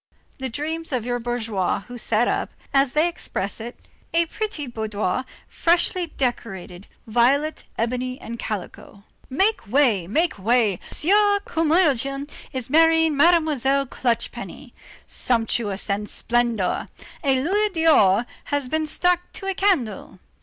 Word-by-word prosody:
The 265 0 -3
dreams 315 +6 -4
of 250 -4 -1
your 245 0 -1
bourgeois 225 -6 -1
who 245 +5 -11
set 230 0 +1
up, - - -1 0.2
as 275 -1 +3
they 310 +3 +3
express 205 - -4
it: 235 +2 -7 0.4
a 335 0 +4
pretty 415 -4 -4
boudoir 220 -1 -2 0.2
freshly 345 +1 +1
decorated, 205 - -4 0.2
violet, 260 +7 +1
ebony 250 +2 -2
and 235 +1 -7
calico. 200 0 -6 0.3
Make 385 - +1
way! 225 -7 +2
Make 310 - 0
way! 215 -2 +2
the - - -1
Sieur 405 +4 +4
Curmudgeon 290 -4 +1 0.2
is 255 -3 -4
marrying 325 +1 +4
Mademoiselle 285 -4 +3
Clutch 245 -2 -1
penny. - - -9 0.3
Sumptuousness 225 -4 -1
and 205 +1 -2
splendor. 235 -5 0 0.4
A 270 -2 +3
louis 415 +6 +1
d'or 300 - +4 0.2
has 285 -3 -2
been 315 +1 0
stuck 355 +3 +1
to 390 - -7
a 390 - 0
candle. 310 - 0
260 Hz, 130 wpm, -23 LUFS, 230-325 Hz, 0.4 s, a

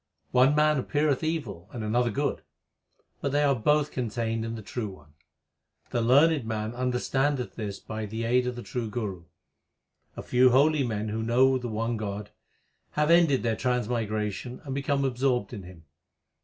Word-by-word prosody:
One 130 +3 +5
man 150 -1 +3
appeareth 145 +2 0
evil 155 - -3
and 115 - -5
another 120 +3 +1
good; 105 - -1 0.8
but 140 - -1
they 145 +1 +2
are 140 -1 +4
both 150 +5 +2
contained 115 -2 -2
in 115 0 -4
the 110 - -8
True 110 0 -4
One: 75 -6 -15 0.8
The 120 - 0
learned 140 +5 +4
man 110 0 -3
understandeth 130 +2 -1
this 105 -3 -5
by 110 -1 -5
the 110 +2 -4
aid 125 +2 +2
of 125 - -2
the 120 - -7
true 120 -4 -4
Guru. 100 -6 -4 0.9
A - - -5
few 125 +1 +4
holy 140 +3 +4
men 110 -3 -2
who 110 +1 -2
know 130 +3 +3
the 125 - -5
one 115 +2 -1
God, 105 -1 -5 0.6
Have 150 +2 +2
ended 165 -6 +4
their 115 -2 +1
transmigration, 115 -2 -2
and 135 -3 -5
become 140 0 0
absorbed 125 -4 0
in 105 - -6
Him. 90 -3 -13
120 Hz, 170 wpm, -27 LUFS, 110-135 Hz, 0.9 s, One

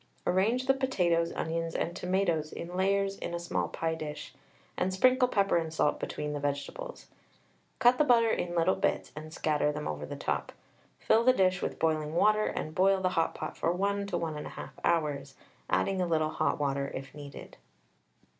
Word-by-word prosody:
Arrange 220 +8 +2
the 270 - +5
potatoes, 180 -11 +1
onions, 165 0 -2
and 170 - -1
tomatoes 180 -5 0
in 175 +1 -7
layers 195 +1 +1
in 170 - -4
a - - -3
small 170 - -1
pie 165 0 -2
dish, 155 -2 -6 0.4
and 185 - 0
sprinkle 255 +6 +4
pepper 200 -6 +2
and 165 -1 -2
salt 155 -2 +1
between 150 0 -4
the 145 - -3
vegetables. 145 - -4 0.7
Cut 245 0 +5
the - - +6
butter 235 -5 +4
in 175 0 -2
little 170 +2 +3
bits, - - -1
and 155 +1 -8
scatter 150 -2 +1
them 150 0 -4
over 75 -1 -4
the - - -5
top. - - -2 0.4
Fill 225 +1 +3
the 255 +1 +6
dish 185 -5 +2
with - - -3
boiling 155 -1 0
water, 215 +4 +4
and 155 - -4
boil 190 +2 +4
the 185 -1 +1
hot 165 -3 0
pot - - -5
for 165 - 0
1 200 +2 0
to 185 -3 -1
1 165 -2 -2
1/2 - - -7
hours, 150 -4 0 0.3
adding 95 - +1
a 180 - +1
little 155 -2 +1
hot - - 0
water 140 -1 0
if 135 0 -7
needed. 145 -1 -10
170 Hz, 185 wpm, -30 LUFS, 155-195 Hz, 0.7 s, the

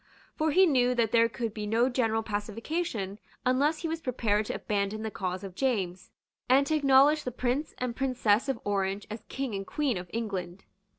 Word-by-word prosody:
For 315 0 +1
he 375 +5 +6
knew 250 -6 +3
that 230 -3 +1
there 230 -1 +4
could 230 -1 -4
be 210 -1 -4
no 230 +4 +3
general 225 -3 0
pacification 215 - -3 0.3
unless 280 +5 +2
he - - 0
was 325 0 -3
prepared 220 -5 0
to - - -3
abandon 205 +1 -2
the 220 - -3
cause 185 -1 -3
of 195 -2 -7
James, 185 -7 -1 0.4
and 270 +2 +5
to 315 - +1
acknowledge 285 +1 +5
the - - -2
Prince 255 +5 -2
and 250 -2 -3
Princess 250 -3 +1
of 265 -4 -1
Orange 200 0 -1
as 215 0 -5
King 265 -4 -3
and 195 -1 -4
Queen 285 -8 0
of 180 0 -7
England. 195 -5 -4
230 Hz, 190 wpm, -29 LUFS, 205-265 Hz, 0.4 s, he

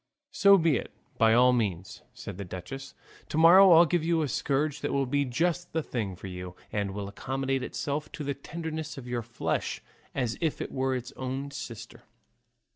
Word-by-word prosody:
"So 200 0 +6
be 165 -6 +3
it - - -5 0.3
by 115 0 +5
all 125 +1 +6
means," 95 -6 -2
said 90 - -8
the - - -3
duchess; 95 +10 -8 0.3
"to - - -3
morrow 180 +4 +8
I'll 165 +1 +8
give 170 0 0
you 165 -1 +2
a - - 0
scourge 145 +3 -1
that - - -1
will 140 -1 +1
be 140 +2 +1
just 170 +7 -1
the 160 -1 0
thing 105 -9 -3
for 90 - -11
you, 90 -1 -7 0.2
and 100 -2 -2
will 100 -1 -4
accommodate 135 +6 -2
itself 145 +3 -3
to 155 - -5
the 140 0 -1
tenderness 160 +2 -6
of 130 -2 -8
your 120 -1 -2
flesh, 120 +1 -2 0.4
as 125 -4 -1
if 160 -3 0
it - - -4
was 130 0 0
its 125 +1 -7
own 135 +2 -4
sister." 120 -3 -8
135 Hz, 195 wpm, -28 LUFS, 115-155 Hz, 0.4 s, morrow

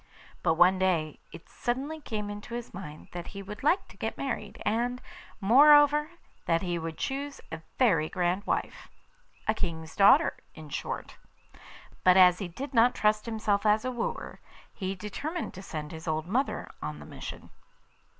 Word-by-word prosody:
But 160 - +2
one 180 +3 +5
day 165 -5 0
it - - -12
suddenly 275 +6 -3
came 210 -6 -4
into 205 +3 -7
his 240 -1 -6
mind 155 -5 -9
that 175 -1 -6
he 200 - -5
would 205 +2 -8
like 320 +7 +2
to - - -16
get - - -3
married, 225 -6 -4
and, 240 +4 0 0.4
moreover, 290 +7 +6 0.4
that 165 +1 +2
he 175 -2 -1
would 160 -1 -5
choose 280 +1 -3
a 160 - -6 0.2
very 165 - +3
grand 180 +3 -1
wife - - -2 0.6
a 215 - +4
King's 160 -6 -4
daughter, 200 0 +6 0.2
in 155 -2 -10
short. - - -5 0.9
But 185 0 +6
as 180 -1 +7
he 195 - -3
did 265 +12 -7
not 240 +1 +5
trust 215 +1 +1
himself 215 -3 0
as 215 +2 +3
a 255 - 0
wooer, 240 -2 -4 0.3
he 190 -1 -3
determined 290 - -5
to 190 - -9
send 155 -5 -6
his 160 +1 -9
old 155 0 -1
mother 245 +10 -1
on - - -4
the - - -11
mission. - - -9
205 Hz, 170 wpm, -29 LUFS, 175-245 Hz, 0.9 s, as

